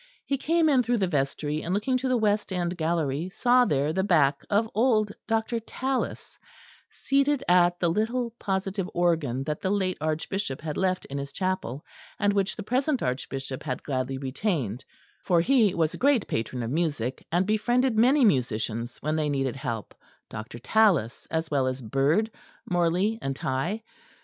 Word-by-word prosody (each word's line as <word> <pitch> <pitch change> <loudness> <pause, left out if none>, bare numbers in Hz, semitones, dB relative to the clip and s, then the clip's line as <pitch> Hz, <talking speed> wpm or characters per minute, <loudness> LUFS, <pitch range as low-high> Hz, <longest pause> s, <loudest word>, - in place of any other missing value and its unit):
He 275 -1 -1
came 330 +3 +2
in 275 -4 +4
through 245 0 +1
the 195 - +2
vestry, 150 -1 -1
and 180 +3 -1
looking 235 +6 0
to 260 +1 -2
the 255 -1 +2
west 210 -2 +1
end 175 -1 -1
gallery 160 -1 -1
saw 245 +5 +4
there 145 - +1
the 190 +2 +1
back 150 -7 +3
of 215 +2 +2
old 215 -2 +2 0.2
Dr. 225 +1 0
Tallis, 260 +4 -3 0.5
seated 275 0 +1
at 175 0 +4
the 175 - +2
little 230 +7 0
positive 190 -1 -2
organ 160 -7 +1
that 150 +1 -3
the 190 - -1
late 190 -2 0
Archbishop 155 0 -2
had 155 -2 -4
left 185 -1 0
in 140 +1 -5
his 140 0 -6
chapel, 185 -8 -3 0.3
and 205 -1 +2
which 200 -1 0
the 210 - -6
present 260 +4 0
Archbishop 130 +1 -3
had 125 - -4
gladly 130 -1 -2
retained, 135 - -2 0.4
for 175 -2 +3
he 215 0 +3
was 160 -2 +1
a - - -6
great 270 -5 +3
patron 120 +2 -2
of 115 - -3
music, 145 -6 -1
and 175 +3 +2
befriended 240 +4 +2
many 255 +5 +5
musicians 120 - 0
when 155 +1 0
they 155 -1 0
needed 135 -3 -1
help 115 -5 -5 0.4
Dr. 110 +2 -7
Tallis, 140 - +2
as 160 -1 -2
well 135 -3 +2
as 130 0 -2
Byrd, 140 - +1 0.4
Morley 180 +5 +1
and 135 0 -2
Tye. 165 +13 -2
175 Hz, 170 wpm, -26 LUFS, 140-220 Hz, 0.5 s, many